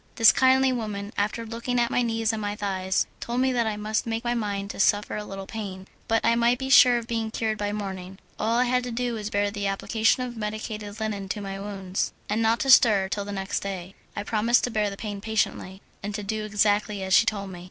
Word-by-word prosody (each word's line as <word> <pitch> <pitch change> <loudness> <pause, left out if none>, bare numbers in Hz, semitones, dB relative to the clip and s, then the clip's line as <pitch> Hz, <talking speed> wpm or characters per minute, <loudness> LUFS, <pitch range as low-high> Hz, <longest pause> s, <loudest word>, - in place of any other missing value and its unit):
This 225 -2 +8
kindly 260 0 +4
woman, 210 -3 -4
after 215 +3 -1
looking 235 +2 -2
at 235 -1 +1
my - - +2
knees 225 -1 0
and 220 - -3
my 205 0 -2
thighs, 190 -2 -1
told 240 +1 -3
me 260 0 +2
that 240 -3 +1
I 215 -1 -2
must 215 +2 -2
make 225 +1 -2
my 240 0 0
mind 205 -3 -2
to - - -10
suffer 205 +1 +2
a 210 - -3
little 195 -1 -7
pain, 190 -3 -6 0.2
but 225 0 +1
I 230 - +5
might 235 +1 +3
be 265 +1 -4
sure 250 -2 +8
of 235 - -4
being 225 -2 -2
cured 220 -1 -2
by 205 - -1
the 205 - -2
morning. 190 -2 -6 0.2
All 225 +2 +1
I 245 - +4
had 250 0 +1
to 245 - -4
do 245 +1 -2
was 215 -2 -4
to - - -7
bear 205 0 +1
the 200 -1 -2
application 220 +5 +1
of 245 -1 -6
medicated 210 -1 -5
linen 205 -3 -3
to 210 - -2
my 195 -1 -5
wounds, 195 -2 -3 0.2
and 215 +2 0
not 225 +1 +2
to 270 - +3
stir 205 -6 +6
till 200 0 -2
the 205 - -6
next 195 -1 -2
day. 190 -2 -6 0.2
I - - -3
promised 230 +3 +2
to 245 - -1
bear 215 -2 +1
the 200 - -8
pain 205 -2 -5
patiently, 205 -3 -2 0.2
and 205 0 -4
to 210 - -4
do 215 +1 -3
exactly 210 -1 +1
as 190 0 -1
she 230 - +6
told 200 -2 -2
me. 180 - -8
215 Hz, 250 wpm, -26 LUFS, 200-230 Hz, 0.2 s, This